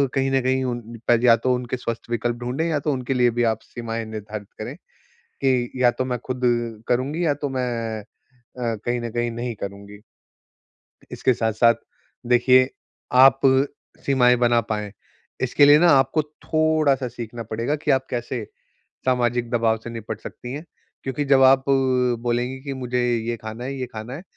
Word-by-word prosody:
कहीं 135 0 +1
न 135 0 +2
कहीं 130 +1 +1
उन 120 -1 -1
या 120 -2 +7
तो 125 +3 +1
उनके 125 0 -3
स्वस्थ 115 -1 -5
विकल्प 120 +1 -1
ढूँढ़े 125 +7 -2
या 155 -3 0
तो 150 - +2
उनके 130 0 -2
लिए 125 -1 +4
भी 120 - +2
आप 110 - -4
सीमाएँ 115 -1 -5
निर्धारित 110 -1 -7
करें - - -5 0.7
कि 125 -2 +2
या 120 - +6
तो 130 - -2
मैं 125 -1 -2
खुद 130 -1 -4 0.5
करुँगी 135 +8 0
या 145 - +2
तो - - +1
मैं 120 -4 -2
अ, 120 +1 -7
कहीं 120 0 -1
न 120 0 -4
कहीं 120 +1 -1
नहीं 120 +1 -4
करुँगी। 100 +1 -8 1.1
इसके 130 - +1
साथ-साथ 115 +1 +3 0.5
देखिये 130 +1 +5 0.5
आप 135 0 +7 0.7
सीमाएँ 125 -3 +4
बना 120 -1 +3
पाएँ। 105 -1 -4 0.5
इसके 130 +3 +4
लिए 145 +1 +7
न - - +2
आपको 140 -1 +4 0.2
थोड़ा-सा 155 -4 +2
सीखना 115 0 -7
पड़ेगा 115 +7 -1
कि - - +3
आप 130 0 +2
कैसे 120 -1 -3 0.6
सामाजिक 120 -2 +1
दबाव 115 -2 +2
से - - -6
निपट 110 -2 -6
सकती 120 +1 -8
हैं, 150 +4 -6 0.4
क्योंकि 135 +2 -2
जब 135 -1 +5
आप 135 0 +6 0.6
बोलेंगी 120 +2 -1
कि 140 -1 -4
मुझे 125 -1 -2 0.2
ये 115 +1 -3
खाना 110 +2 -7
है 135 +2 -4
ये 130 - -2
खाना 110 +3 -6
है, 165 - -9
125 Hz, 170 wpm, -23 LUFS, 115-130 Hz, 1.1 s, या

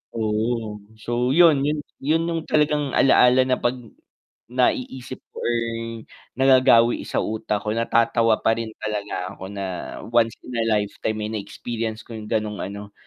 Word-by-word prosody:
Oo. 110 0 -1 0.2
So 120 +3 -1
yun, 165 -5 +6
yun 150 +2 0 0.2
yun 160 +4 +1
yung 165 -1 -1
talagang 150 -2 +1
ala-ala 130 -1 +5
na 130 - +3
'pag 120 +1 0 0.8
naiisip 130 0 -1
ko - - -8
or 120 - 0 0.8
nagagawi 130 -3 +5
sa - - -1
utak 105 -1 -2
ko 105 - -1
natatawa 115 -1 +3
pa 115 - +3
rin 115 -1 -3
talaga 105 -3 -3
ako 95 - -9
na 100 -1 -5 0.5
once 115 -1 +3
in 125 - -8
a 115 - +1
lifetime 105 +1 -3
eh, - - -6
na-experience 110 +2 -5
ko - - -14
yung 105 -1 -8
ganong 110 -2 -1
ano, 100 +1 -7
115 Hz, 150 wpm, -23 LUFS, 110-130 Hz, 0.8 s, yun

